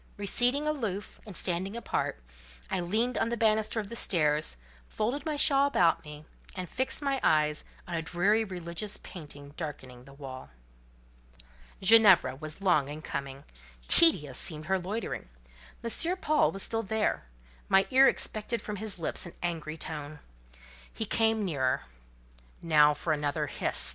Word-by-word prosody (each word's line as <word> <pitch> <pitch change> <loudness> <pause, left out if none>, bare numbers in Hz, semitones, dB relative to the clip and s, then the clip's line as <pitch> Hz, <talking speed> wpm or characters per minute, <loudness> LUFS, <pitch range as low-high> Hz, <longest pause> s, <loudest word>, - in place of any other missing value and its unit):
Receding 245 +8 +3
aloof, 220 -10 -4
and 200 - -7
standing 190 +4 -2
apart, 235 - -3 0.5
I - - 0
leaned 220 +8 0
on - - 0
the 235 - -2
banister 220 0 +1
of 210 - -4
the 235 - -8
stairs, 150 - +1 0.3
folded 260 +8 -3
my 305 - -1
shawl 280 -1 +4
about 175 -12 +2
me, 150 0 -11 0.3
and 185 -1 -5
fixed 260 - -2
my 275 -1 0
eyes 150 -1 +2 0.2
on 175 - -6
a 165 - -1
dreary 185 +7 +1
religious 185 +1 -5
painting 145 -4 -11
darkening 130 -6 -7
the 135 - -14
wall. 130 - -9 1.3
Ginevra 190 -10 +6
was 155 +5 -8
long 155 -7 +3
in 150 +2 -8
coming: 135 0 -5 0.4
tedious 150 - +5
seemed 155 -1 0
her 190 +3 +1
loitering. 195 - -5 0.5
M. 335 +10 +1
Paul 305 -4 +2
was 195 - -3
still 225 0 0
there; 220 - -1 0.4
my 195 0 +5
ear 265 +1 +7
expected 225 0 -1
from 210 -1 -6
his 215 -1 -2
lips 170 +1 -1
an 170 - -11
angry 165 -2 -3
tone. 150 -2 -6 0.7
He 220 - -4
came 220 0 +1
nearer. 135 -7 0 0.8
"Now 150 -3 +4
for 160 - -1
another 145 -2 -1
hiss!" - - +4
185 Hz, 150 wpm, -29 LUFS, 150-225 Hz, 1.3 s, ear